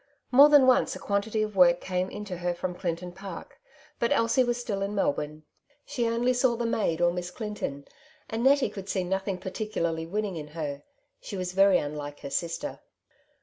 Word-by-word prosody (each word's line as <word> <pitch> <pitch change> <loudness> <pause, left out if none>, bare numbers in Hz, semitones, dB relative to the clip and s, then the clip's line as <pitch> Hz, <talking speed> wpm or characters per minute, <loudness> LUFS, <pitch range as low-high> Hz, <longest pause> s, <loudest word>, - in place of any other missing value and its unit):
More 280 +4 +8
than 290 -3 +7
once 255 -1 +3
a - - -7
quantity 210 +2 0
of 210 -1 -4
work 175 -2 +6
came 185 0 -2
in 210 0 -7
to 185 -3 -5
her 175 0 -2
from 180 +1 -3
Clinton 175 0 -4
Park, 190 +2 -9 0.4
but 235 - +1
Elsie 230 +3 +3
was 240 0 -1
still 210 -5 -3
in 200 +1 -2
Melbourne. 150 -4 -1 0.4
She 240 -2 -1
only 235 +2 +1
saw 245 -1 +2
the 235 0 -2
maid, 190 -7 0
or 175 0 +3
Miss 175 0 -4
Clinton; 180 -9 -5 0.4
and 225 +1 -3
Nettie 270 -4 +4
could 195 -1 -8
see 190 - 0
nothing 190 +1 -2
particularly 180 -4 -3
winning 200 0 -2
in 150 -1 -6
her; 145 -3 -3 0.4
she 210 - -7
was 180 -1 -3
very 195 0 +5
unlike 145 0 -5
her 140 - -7
sister. 170 - -3
195 Hz, 190 wpm, -27 LUFS, 175-230 Hz, 0.4 s, More